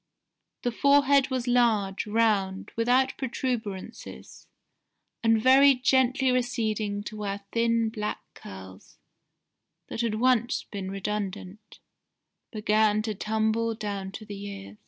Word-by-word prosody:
The 245 - 0
forehead 280 +1 +4
was 255 -2 -2
large, 220 -6 +1
round, 205 -3 0
without 245 +3 +2
protuberances, 235 -5 -5 0.7
and 225 -1 +3
very 270 +3 +6
gently 260 +1 +2
receding 220 -5 -1
to 215 - -7
where 200 -1 -4
thin 230 -1 +1
black 210 - -4
curls, 95 0 -12 0.9
that - - -3
had 230 -2 -1
once 245 +1 +1
been 195 -2 -6
redundant, 200 0 -5 0.7
began 215 -1 +2
to 220 -1 -2
tumble 220 +2 -1
down 200 -3 -5
to 215 - -8
the 205 -1 -8
ears. 200 +1 -9
220 Hz, 115 wpm, -27 LUFS, 205-245 Hz, 0.9 s, very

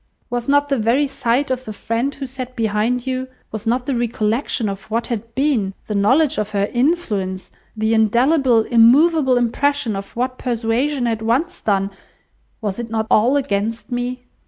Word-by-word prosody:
Was 245 +1 -2
not 285 0 +3
the 275 -3 +1
very 235 +7 +2
sight 270 0 0
of 255 0 -2
the 215 - -6
friend 230 +6 -2
who 275 - -5
sat 255 -1 -7
behind 225 +2 0
you, 260 0 -2 0.2
was 220 +1 -6
not 245 +2 +1
the 275 - -1
recollection 235 0 -1
of 195 +1 -6
what 230 +2 -1
had 230 -1 -5
been, 250 -9 +1
the 215 - -4
knowledge 260 +9 +3
of 210 -1 -2
her 200 0 +1
influence, 235 - -1 0.3
the 220 +1 +1
indelible, 240 +3 +3
immoveable 260 +4 +4
impression 245 -1 0
of 195 0 -7
what 255 +2 -2
persuasion 245 +3 0
had 225 -2 -1
once 250 +10 0
done—was 195 +1 -4
it 235 -1 -5
not 220 0 -1
all 245 +6 +4
against 230 -3 -2
me?" 245 +1 -3
240 Hz, 165 wpm, -20 LUFS, 220-265 Hz, 0.3 s, immoveable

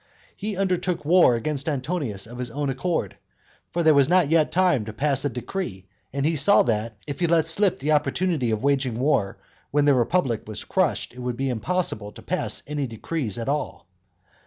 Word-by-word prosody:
He 205 -1 -4
undertook 185 -4 -1
war 170 -6 +5
against 140 +5 -2
Antonius 135 - -2
of 120 +2 -10
his 125 -1 -3
own 140 +3 -2
accord; 135 - -2 0.5
for 170 - -1
there 160 -1 +6
was 140 0 +4
not 175 -4 +3
yet 160 -2 +3
time 180 -10 +2
to 110 - -7
pass 135 +2 0
a - - +2
decree; 125 - -5 0.3
and 140 +1 -2
he 160 +1 +2
saw 155 +8 +5
that, 110 -1 -2
if 145 -2 -6
he 175 - +2
let 165 -1 +3
slip 185 +4 +1
the 150 +3 -1
opportunity 150 -1 +1
of 110 +1 -1
waging 135 -4 +1
war, 125 -8 +1 0.3
when 145 0 +2
the 145 - +5
republic 125 -2 +1
was 110 - -6
crushed - - 0
it 125 - -12
would 125 -1 -3
be 135 +1 -1
impossible 125 - -1
to - - -13
pass - - 0
any 145 -1 -3
decrees 115 - -3
at 115 - -4
all. 140 - -3
140 Hz, 195 wpm, -24 LUFS, 120-165 Hz, 0.5 s, there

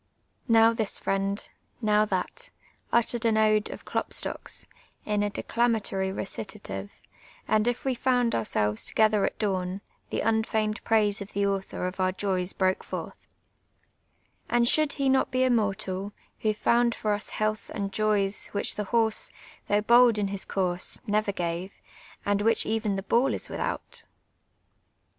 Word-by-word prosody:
Now 225 -1 +6
this 220 -3 0
friend, 195 +1 -1 0.3
now 215 -2 +3
that, 185 -3 -3 0.4
uttered 235 0 +2
an 225 -2 +3
ode 215 -1 +3
of - - -9
Klopstoek's, - - -2 0.4
in 210 -1 0
a 205 - +1
decla 235 +3 0
matory 195 -3 -1
recitative; 195 - -5 0.6
and 215 +2 +2
if 245 +2 -1
we 265 -1 +1
foimd 245 -1 +2
ourselves 105 -1 0
together 215 -2 +3
at - - -3
dawn, 190 -2 -1 0.3
tlie - - -1
unfeigned 220 -1 0
praise 210 -2 +2
of 200 - -8
the 200 0 +1
author 195 -2 -2
of 185 +1 -4
our 185 0 +2
joys 185 -1 -1
broke 190 0 0
forth: - - -5 0.6
— - - -43
" - - -40
And 240 0 +3
should 305 +2 +4
he 275 -2 0
not 265 0 +3
l)e 255 - +4
immortal, 205 -5 0 0.3
Who 215 - 0
finind 235 +2 +2
for 210 -1 0
us 205 0 -4
health 215 0 -2
and 200 -2 -3
jo\ 215 +1 +2
s 195 +1 -2
Which 200 - 0
the 210 - -2
liorsc, 225 0 +1 0.4
thuucrh 205 +1 +1
hold 240 -1 +6
in 200 -2 0
his 195 -1 -4
course, 180 -2 -1
never 210 -1 +1
gave. 175 +1 -3 0.5
And 205 0 +1
which 225 +2 +3
even 220 -2 0
the 195 - -3
ball 240 +6 +2
id - - -5
wilhuul!" - - -4
210 Hz, 160 wpm, -27 LUFS, 195-225 Hz, 0.6 s, Now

